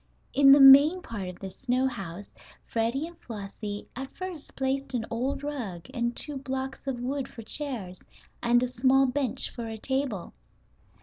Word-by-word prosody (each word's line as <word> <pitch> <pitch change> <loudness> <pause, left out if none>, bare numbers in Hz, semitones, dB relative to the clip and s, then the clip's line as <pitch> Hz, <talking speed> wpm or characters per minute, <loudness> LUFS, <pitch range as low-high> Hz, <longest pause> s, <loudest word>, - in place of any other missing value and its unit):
In 275 0 +7
the 280 - +9
main 280 +6 +8
part 205 -5 -5
of 180 - -9
the 190 -1 -7
snow 255 +4 0
house 195 -6 -5 0.3
Freddie 235 +6 -1
and 340 +1 -11
Flossie 205 -1 -6
at 265 +2 -5
first 365 -5 -7
placed 270 0 -1
an 225 -2 -1
old 255 +5 -2
rug 230 - -5
and 235 -2 -1
two 295 -2 -4
blocks 265 0 -5
of 260 -3 -2
wood 270 +2 -2
for 230 - -10
chairs, 220 -9 -3 0.4
and 240 +1 +3
a - - +1
small 260 +2 +3
bench 265 -1 -1
for 235 -1 -6
a 225 0 -5
table. 265 -5 -2
255 Hz, 170 wpm, -28 LUFS, 225-275 Hz, 0.4 s, the